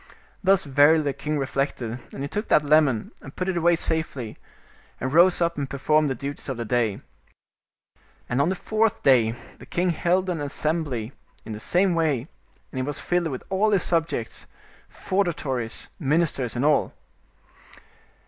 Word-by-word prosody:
Thus 195 0 +4
verily 145 +3 +4
the 140 -1 -1
king 150 +2 -3
reflected, 135 -3 -2
and 135 - -6
he - - -2
took 210 +9 -3
that 150 - +4
lemon, 145 -7 +3
and 135 - -11
put 185 - -3
it 190 - 0
away 170 0 +3
safely, 160 -9 -2 0.6
and 130 +1 -3
rose 175 +2 +5
up 170 -2 +1
and 140 -1 -3
performed 150 +2 +2
the 135 - -1
duties 140 +4 -6
of 130 - -3
the 120 - -3
day. 115 -3 0 1.3
And 125 +3 +1
on 150 - +2
the 190 - 0
fourth 220 +3 0
day 120 -4 +4 0.2
the - - -13
king 180 +1 0
held 180 +3 +1
an 175 -4 -2
assembly 145 -5 -2 0.3
in 110 - -6
the 105 - -6
same 180 - +2
way, 155 -7 +1 0.5
and 130 - -4
it - - 0
was 145 +1 -3
filled 175 +1 0
with 130 -5 -5
all 200 +3 +2
his 200 -3 +2
subjects, 165 -9 -1 0.4
feudatories, 145 - -2
ministers 145 -5 0
and 125 +4 0
all. 150 -1 +2
150 Hz, 165 wpm, -24 LUFS, 130-170 Hz, 1.3 s, rose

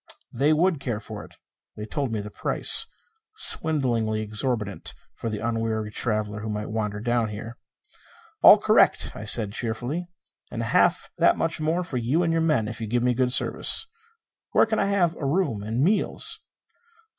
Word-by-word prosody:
They 140 +5 +2
would 165 0 +2
care 120 -6 -3
for - - -9
it. - - -16 0.4
They 105 - -6
told 135 +3 -3
me 110 -2 -2
the 105 +1 -9
price 450 - +4 0.5
swindlingly 120 - 0
exorbitant 110 -1 -3 0.2
for 115 - -5
the 105 - -4
unwary 110 -2 -2
traveller 105 -2 -2
who 110 +1 -6
might 105 0 -4
wander 105 -2 -3
down 120 0 0
here. 110 +3 -8 0.8
"All - - +9
correct," - - +3
I 105 - -8
said 110 -1 +5
cheerfully. 120 +11 -4 0.4
"And - - -4
half - - +1
that - - +4
much 165 -1 -2
more 165 +4 0
for 155 -7 -5
you 130 +9 0
and 165 -1 0
your 165 - +1
men 150 -9 +1
if 110 - -7
you 110 - -3
give 120 +2 0
me 125 0 +2
good 125 +1 0
service. 130 - +1 0.7
Where - - +5
can 220 -1 -1
I - - +1
have 180 -4 +1
a - - -8
room 140 - 0
and 110 +5 -2
meals?" 205 +6 +1
120 Hz, 175 wpm, -24 LUFS, 110-155 Hz, 0.8 s, All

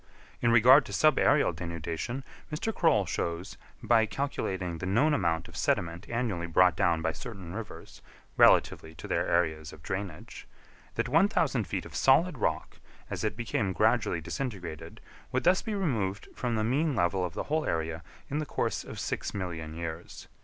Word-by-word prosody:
In 120 - +3
regard 125 +5 +7
to - - -8
subaërial 145 - +3
denudation, 85 - -4 0.3
Mr. 190 +9 -2
Croll 155 - +3
shows, 85 +1 -3 0.3
by 110 -1 +4
calculating 95 - -3
the 95 - -4
known 140 +11 +3
amount 85 - 0
of - - -14
sediment 85 +2 -1
annually 115 -8 -2
brought 90 +1 +4
down 85 -3 +1
by 80 - +1
certain 90 0 -8
rivers, 110 0 -9 0.3
relatively 80 0 +4
to 80 - -9
their - - 0
areas 80 -3 0
of 75 - -14
drainage, 95 -2 -6 0.5
that - - 0
1,000 155 - +2
feet - - -3
of - - -11
solid 150 +2 +3
rock, - - -2 0.3
as - - -3
it 90 - -1
became 105 -4 -1
gradually 80 - +2
disintegrated, 90 - -6 0.3
would 130 0 0
thus 185 +2 +4
be 220 - -3
removed 110 - -2
from 120 -2 -2
the 110 - 0
mean 140 +6 +1
level 90 -1 +1
of 90 -3 -4
the - - -2
whole 155 +1 -1
area 80 0 -2 0.3
in 145 - -2
the 155 - -2
course - - -2
of - - -8
six - - -3
million 80 -5 -5
years. 85 0 -7
100 Hz, 165 wpm, -29 LUFS, 85-130 Hz, 0.5 s, regard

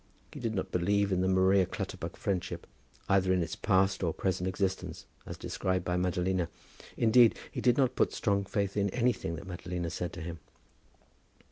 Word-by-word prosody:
He - - -7
did 115 -2 -2
not 95 - -2
believe 100 +3 +2
in 90 -1 +2
the 95 - +2
Maria 95 0 +4
Clutterbuck - - -5
friendship, 95 -2 -2 0.4
either 95 -1 +3
in 90 -2 +3
its 80 - -4
past 95 -1 +2
or 85 -4 0
present 95 -1 -1
existence, 95 0 -2 0.2
as - - -6
described 95 -1 -2
by 90 - 0
Madalina. 90 0 0 0.5
Indeed, 115 0 +5
he - - -4
did 125 -1 +4
not 130 -2 +2
put - - +2
strong 100 -2 +1
faith 100 0 -2
in 100 -1 +1
anything 120 -7 0
that 80 - -8
Madalina 85 -1 -4
said 90 -1 -3
to 90 - -7
him. 85 0 -6
95 Hz, 175 wpm, -30 LUFS, 90-100 Hz, 0.5 s, Indeed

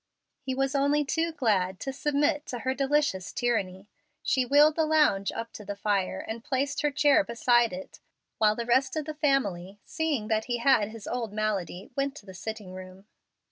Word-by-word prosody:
He 260 -2 -3
was 270 +1 0
only 285 +1 +2
too 325 +4 0
glad 195 - 0
to 270 - -3
submit 290 +1 0
to 245 - -4
her 260 - 0
delicious 275 -9 0
tyranny. 200 -6 -1 0.4
She 255 -1 +1
wheeled 295 +3 +5
the 320 - +2
lounge 300 -11 +3
up 230 0 -6
to 210 - -9
the 205 0 -5
fire, 200 -2 0
and 225 +1 -5
placed 285 +1 -1
her 295 - +2
chair 290 +1 +4
beside 240 -1 +2
it, 185 +1 -9 0.4
while 215 -1 +4
the 235 - -3
rest 265 +4 +2
of 310 -2 -2
the 310 - -4
family, 205 - 0
seeing 315 -9 -2
that 220 0 0
he 240 -1 -1
had 235 -4 +3
his 220 -1 -10
old 230 -4 -3
malady, 200 -4 -3
went 275 0 -1
to 215 - -12
the 190 - -10
sitting 205 0 -7
room. 185 +1 -11
240 Hz, 190 wpm, -28 LUFS, 205-285 Hz, 0.4 s, wheeled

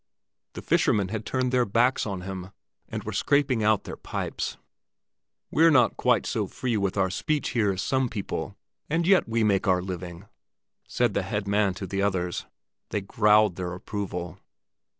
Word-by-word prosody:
The - - -8
fishermen 100 -3 +2
had 110 +1 -4
turned 130 -1 0
their 125 -1 +3
backs 120 +3 +2
on 95 -3 -4
him, 95 0 -6 0.4
and - - -5
were - - -5
scraping 140 -5 +2
out 110 -1 +3
their - - -7
pipes. - - -4 0.9
"We're 165 +1 +5
not 130 -6 +4
quite - - +2
so - - -1
free 125 -3 -2
with 100 -1 -1
our 95 -1 +2
speech 150 - -1
here 110 -5 +1
as 95 +1 -3
some 130 +1 +1
people, 105 -4 -4 0.3
and 165 +2 +1
yet 190 -8 +4
we 115 0 +1
make 100 0 +2
our 90 -1 +4
living," 90 0 -6 0.6
said 120 -4 +1
the 100 - +1
head 100 +2 -3
man 100 -2 +2
to 100 - -5
the 95 +1 -2
others. 90 -3 -1 0.4
They 105 - -1
growled 105 -1 +3
their 90 -1 -3
approval. 90 -2 -5
105 Hz, 170 wpm, -26 LUFS, 95-120 Hz, 0.9 s, We're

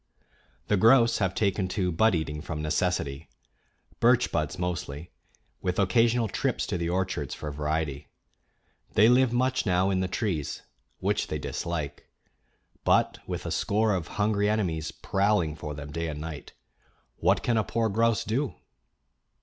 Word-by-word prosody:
The 105 - +2
grouse 115 +2 +5
have 95 -3 0
taken 100 -2 +1
to 90 -3 +1
bud 110 +5 +3
eating 75 -2 -3
from 80 -1 -5
necessity 75 -2 -1 0.7
birch - - +4
buds - - -1
mostly, 85 -3 -4 0.5
with 90 0 -1
occasional 115 +4 +3
trips - - -1
to - - -2
the 85 0 -1
orchards 90 -6 -2
for 75 - -5
variety. 75 0 -2 0.9
They 105 - +7
live 125 0 +5
much 130 +2 +1
now 95 -1 +2
in 95 - +1
the 95 - 0
trees, 90 - -2 0.4
which - - 0
they - - -2
dislike; 80 -5 -4 0.7
but - - +2
with - - -4
a - - -3
score 105 +1 +1
of 90 -4 -2
hungry 105 -1 +2
enemies 85 -7 -1
prowling 95 -6 0
for 75 -1 -6
them 75 0 -8
day 85 +2 -3
and 75 -2 -5
night, 80 -2 -7 0.6
what - - +2
can 120 - +1
a 110 - +2
poor 115 +1 0
grouse 115 +1 +2
do? 120 0 -1
90 Hz, 150 wpm, -27 LUFS, 80-110 Hz, 0.9 s, They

